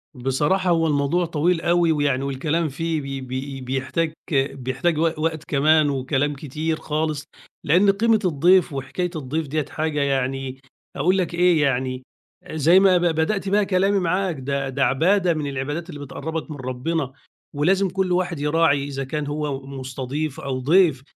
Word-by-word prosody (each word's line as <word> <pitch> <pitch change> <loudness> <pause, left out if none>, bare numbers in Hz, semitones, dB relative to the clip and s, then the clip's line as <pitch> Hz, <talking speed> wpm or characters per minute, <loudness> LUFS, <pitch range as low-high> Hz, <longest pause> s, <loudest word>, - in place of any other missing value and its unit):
بصراحة 145 +9 0
هو 165 -1 +3
الموضوع 145 +4 +1
طويل 165 +1 0
أوي 170 -1 +3
ويعني 145 -3 +1
والكلام 150 +4 -1
فيه 160 +3 -2 0.2
ب 130 - -9
ب 135 +1 -5
بيحتاج 135 +5 -1 0.2
بيحتاج 135 +4 0
وق 165 -1 0
وقت 160 -1 -1
كمان 155 +1 +3
وكلام 140 +1 0
كتير 155 +3 -3
خالص، 155 -1 -2 0.4
لأن 185 +7 +4
قيمة 220 +2 +2
الضيف 175 +1 +3
وحكاية 140 +7 -3
الضيف 155 +1 -3
ديّة 155 +1 -1
حاجة 155 -1 -2
يعني 135 -1 -1 0.4
أقول 180 +7 +2
لك 180 -2 -1
إيه، 175 -2 +3
يعني 130 -2 0 0.5
زي 160 +4 +5
ما 190 -2 +5
ب - - 0
بدأت 175 +4 0
بقى 205 +1 +3
كلامي 195 +1 +2
معاك 180 0 0
ده 135 0 -2
ده 135 +1 0
عبادة 175 +7 +2
من 150 -2 -3
العبادات 145 +6 -4
اللي 145 -4 -8
بتقرّبك 160 +3 -5
من 145 - -6
ربنا 130 +3 -3 0.4
ولازم 190 +7 +2
كل 185 0 -1
واحد 175 -3 0
يراعي 150 -1 +2
إذا 135 -1 -4
كان 150 +2 -4
هو 145 -2 -3
مستضيف 135 +2 -4
أو 130 -2 -3
ضيف، 155 -1 +3
150 Hz, 160 wpm, -22 LUFS, 135-170 Hz, 0.5 s, زي